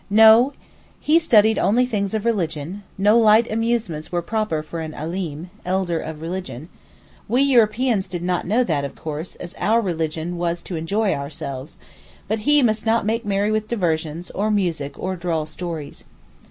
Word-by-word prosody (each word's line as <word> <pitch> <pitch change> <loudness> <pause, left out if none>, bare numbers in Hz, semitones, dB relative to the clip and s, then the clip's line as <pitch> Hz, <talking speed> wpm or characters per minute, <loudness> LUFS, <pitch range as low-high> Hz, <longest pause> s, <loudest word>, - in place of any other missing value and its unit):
No; 220 +6 +7 0.5
he 315 +2 +4
studied 220 -8 +4
only 245 +5 +3
things 210 -4 -2
of 215 0 -2
religion, 180 -4 -2 0.2
no 210 +4 +4
light 220 +1 +5
amusements 220 -8 -1
were 175 -1 -1
proper 215 -6 -1
for 165 +2 -6
an 160 -1 -6
Alim 165 +1 -5
(elder 180 -2 0
of 160 0 -7
religion); 165 -4 -5 0.6
we 245 +5 +3
Europeans 235 -5 +3
did 175 -2 -5
not 180 -1 -1
know 230 +6 +3
that, 155 -10 -1
of 140 - -5
course, 155 +2 -6
as 175 0 -8
our 225 +2 +3
religion 165 -3 -2
was 170 0 -1
to 180 - -6
enjoy 195 +6 0
ourselves; 140 0 -6 0.5
but 220 +2 -1
he 295 -1 +5
must 215 -2 +1
not 225 -1 +1
make 225 +2 -1
merry 200 +1 +1
with 215 0 -1
diversions, 170 -5 -2
or 210 +2 -1
music, 170 -9 -1
or 185 +1 -3
droll 170 -3 -2
stories. 155 -2 -6
190 Hz, 165 wpm, -22 LUFS, 160-220 Hz, 0.6 s, No